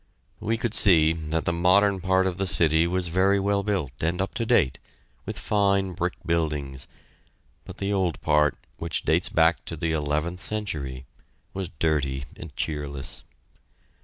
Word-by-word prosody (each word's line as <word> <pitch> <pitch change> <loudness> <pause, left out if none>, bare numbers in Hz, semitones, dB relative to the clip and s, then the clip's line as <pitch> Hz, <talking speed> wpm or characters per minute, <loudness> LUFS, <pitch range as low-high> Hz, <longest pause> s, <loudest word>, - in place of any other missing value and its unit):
We 115 +2 -1
could 115 -1 -2
see 80 -8 +6
that 80 -1 -3
the 85 - +1
modern 95 +3 +3
part 95 +1 +2
of 95 -1 -2
the 95 - 0
city 80 -1 +3
was 90 0 -1
very 95 +3 +3
well 100 +1 +1
built 100 -9 -1
and 85 +3 0
up 95 - -2
to 115 -1 -2
date, 65 - +3 0.5
with - - -4
fine 100 -2 +1
brick 90 +1 -2
buildings, 75 -5 -2 0.8
but - - -10
the 100 +1 -1
old 95 -4 0
part, 75 -1 +2 0.2
which 85 -1 -3
dates 80 +3 +2
back 80 0 +3
to 80 - -5
the 80 +1 -1
eleventh 75 +3 -1
century, 75 -12 -4 0.5
was 95 -3 -4
dirty 70 -4 0
and - - -10
cheerless. 70 -3 -4
85 Hz, 160 wpm, -25 LUFS, 75-95 Hz, 0.8 s, see